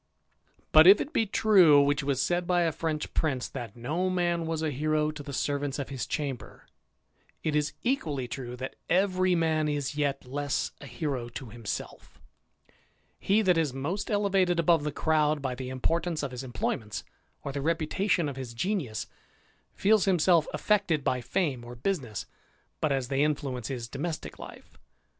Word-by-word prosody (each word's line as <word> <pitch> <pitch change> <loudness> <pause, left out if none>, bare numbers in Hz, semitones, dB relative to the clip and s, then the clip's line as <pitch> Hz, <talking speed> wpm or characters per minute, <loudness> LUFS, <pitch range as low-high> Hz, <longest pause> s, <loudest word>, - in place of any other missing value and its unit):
But 155 +2 +8
if 195 +2 +9
it 295 - -4
be 225 - +2
true, 190 -8 +6
which 145 +1 +3
was 140 -2 0
said 175 +5 0
by 180 -1 +3
a 165 - +2
French 155 -1 -3
prince, 135 -6 0
thtit 120 -6 -7
no 155 +10 -1
man 175 -2 0
was 160 -1 -2
a 155 - 0
hero 155 +2 0
to 150 -1 -8
the 145 0 -8
servants 140 +1 -1
of 140 -2 -4
his 135 -3 -4
chamber^ 135 -8 -4 0.8
it 155 -1 0
is 150 0 +1
equally 155 - -1
true, 125 0 -6
that 130 +1 -6
every 185 -1 +3
man 160 -2 +1
is 145 -1 -2
yet 140 -2 -1
less 145 +2 -2
a 140 - -9
hero 135 -6 -3
to 120 -1 -8
himself 115 -2 -7 1.0
He 210 +3 +2
that 180 -4 +4
is 150 -5 0
most 160 +10 -3
elevated 195 -4 +2
above 165 -2 +4
the 150 - -1
crowd 155 0 +2
by 135 -2 -2
the 130 0 -6
import 160 +6 0
ance 160 -4 -2
of 140 - -3
his 125 +1 -6
employments, 115 -4 -3 0.4
or 140 - -3
the 140 0 -3
reputation 165 +3 +1
of 140 -2 -5
his 125 -3 -6
genius, 155 - -2 0.7
feels 210 +1 +3
himself 175 -3 +4
affected 175 -8 +1
by 125 -1 0
fame 130 0 -1
or 120 +1 -9
business 125 - -3 0.5
but 155 - +1
as 135 -2 -1
they 135 0 +1
influence 140 -5 -1
his 120 -4 -4
domestick 155 +6 -5
life. - - -12
150 Hz, 175 wpm, -28 LUFS, 135-175 Hz, 1.0 s, if